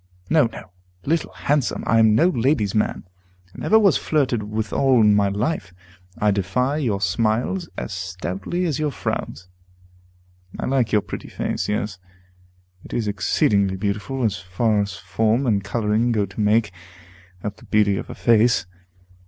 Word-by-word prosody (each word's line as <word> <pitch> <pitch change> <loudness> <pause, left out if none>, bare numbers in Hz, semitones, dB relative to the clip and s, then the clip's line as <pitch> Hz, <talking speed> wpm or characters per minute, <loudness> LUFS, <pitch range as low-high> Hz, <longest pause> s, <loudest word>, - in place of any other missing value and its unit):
No, 155 -4 +5
no, 95 -4 -11 0.3
Little 165 +2 0
Handsome! 145 -3 -1
I 115 - +3
am 110 -1 +5
no 170 +9 +4
lady's 125 - +1
man, 105 - 0 0.5
and - - -10
never 220 - +4
was 200 -6 +4
flirted 135 -7 0
withal 110 +5 +1
in 105 -1 +5
my 100 -1 +3
life. 100 - -2 0.4
I 105 0 +2
defy 105 +9 0
your 115 -10 0
smiles, 115 - 0
as 105 - -4
stoutly 95 - -3
as 155 -5 -1
your 155 -1 0
frowns. 90 - -4 1.1
I - - -2
like 130 -3 +1
your 105 - +3
pretty - - -7
face; - - -3
yes, 105 -2 -2 0.8
it - - -7
is 115 -3 -1
exceedingly 100 0 +1
beautiful, 105 +7 -3
as 105 -4 0
far 105 +4 0
as 100 -2 -4
form 110 +7 0
and 105 -5 +1
coloring 110 +2 0
go 105 -3 +1
to 100 +3 -6
make 105 0 +2 0.7
up 105 -1 -4
the - - -16
beauty 105 -2 +2
of - - -6
a - - -7
face. 115 -4 +3
110 Hz, 160 wpm, -22 LUFS, 100-125 Hz, 1.1 s, No